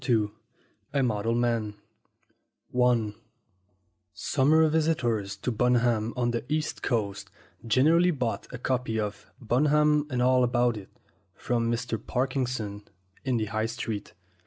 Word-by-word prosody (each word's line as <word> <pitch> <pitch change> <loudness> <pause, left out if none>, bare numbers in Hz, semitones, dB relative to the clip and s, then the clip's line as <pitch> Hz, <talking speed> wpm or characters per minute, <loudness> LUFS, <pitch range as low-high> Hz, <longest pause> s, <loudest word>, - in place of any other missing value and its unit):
II 110 -3 +2 0.6
A 140 -2 +2
MODEL 115 -1 0
MAN 115 -3 0 2.4
SUMMER 155 +7 +3
visitors 120 -11 0
to 125 - -2
Bunham 120 -1 +2
on 120 -1 +1
the 120 - -2
East 155 0 -1
Coast 100 -5 -2 0.4
generally 160 +10 +4
bought 125 -9 -2
a 125 - -5
copy 125 -3 -1
of 105 0 -4
"Bunham 150 +5 +3
and 125 -3 -2
All 125 +1 +4
About 120 -1 +2
It" 100 -3 -9 0.5
from 115 -1 -1
Mr. 120 -1 -3
Parkinson 125 -5 -2 0.4
in 130 -3 0
the 110 - 0
High 110 +1 0
Street. 115 -2 -5
120 Hz, 120 wpm, -27 LUFS, 110-130 Hz, 2.4 s, generally